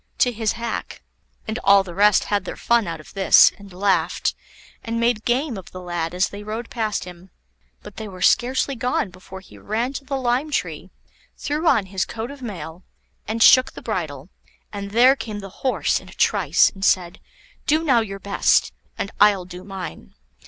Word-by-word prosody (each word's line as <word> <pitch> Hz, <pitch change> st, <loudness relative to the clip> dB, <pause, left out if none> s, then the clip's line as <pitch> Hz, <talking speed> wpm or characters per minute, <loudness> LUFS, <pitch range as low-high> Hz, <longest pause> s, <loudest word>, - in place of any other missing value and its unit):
to 245 Hz, -, +3 dB
his 220 Hz, -2 st, -1 dB
hack. 235 Hz, 0 st, -5 dB, 0.4 s
And 220 Hz, +2 st, -3 dB
all 200 Hz, 0 st, +6 dB
the 180 Hz, -2 st, -9 dB
rest 205 Hz, +2 st, +4 dB
had 205 Hz, -1 st, -1 dB
their -, -, -6 dB
fun 235 Hz, -4 st, +1 dB
out 165 Hz, -1 st, -5 dB
of 155 Hz, -, -15 dB
this, 195 Hz, -1 st, +6 dB
and 200 Hz, -1 st, -13 dB
laughed, 180 Hz, -2 st, 0 dB, 0.5 s
and 230 Hz, 0 st, -3 dB
made 235 Hz, -2 st, +1 dB
game 245 Hz, -2 st, 0 dB
of 185 Hz, -, -13 dB
the 185 Hz, -, -9 dB
lad 175 Hz, -1 st, -4 dB
as 180 Hz, +1 st, +1 dB
they 205 Hz, -, -9 dB
rode 220 Hz, +3 st, -6 dB
past 220 Hz, -4 st, -2 dB
him. 180 Hz, +1 st, -12 dB, 0.5 s
But 210 Hz, -, -12 dB
they 220 Hz, -, -6 dB
were 185 Hz, -2 st, -7 dB
scarcely 260 Hz, +3 st, +2 dB
gone, 245 Hz, -5 st, -1 dB
before 185 Hz, +1 st, -11 dB
he 190 Hz, -, -16 dB
ran 230 Hz, +5 st, -2 dB
to 280 Hz, -, -6 dB
the 275 Hz, 0 st, -3 dB
lime 255 Hz, +3 st, 0 dB
tree, 175 Hz, -, -3 dB, 0.5 s
threw 305 Hz, +3 st, -2 dB
on 220 Hz, -10 st, +4 dB
his 190 Hz, 0 st, -2 dB
coat 230 Hz, +3 st, -6 dB
of 280 Hz, -1 st, -12 dB
mail, 185 Hz, -6 st, -7 dB, 0.4 s
and 225 Hz, +1 st, +1 dB
shook 255 Hz, 0 st, +6 dB
the -, -, -10 dB
bridle, 160 Hz, -, -4 dB, 0.4 s
and 200 Hz, -1 st, -5 dB
there 245 Hz, +6 st, +5 dB
came 215 Hz, -6 st, -6 dB
the 195 Hz, -2 st, -10 dB
Horse 260 Hz, -, +1 dB
in -, -, -15 dB
a -, -, -13 dB
trice, -, -, +3 dB
and 195 Hz, -1 st, -10 dB
said: 180 Hz, -3 st, +1 dB, 0.5 s
"Do 310 Hz, +2 st, +2 dB
now 265 Hz, -7 st, +4 dB
your 200 Hz, -3 st, -4 dB
best, 200 Hz, +1 st, +2 dB, 0.2 s
and 200 Hz, -, -4 dB
I'll 205 Hz, -3 st, +5 dB
do 180 Hz, 0 st, -10 dB
mine." 185 Hz, -, -8 dB
205 Hz, 195 wpm, -22 LUFS, 185-240 Hz, 0.5 s, all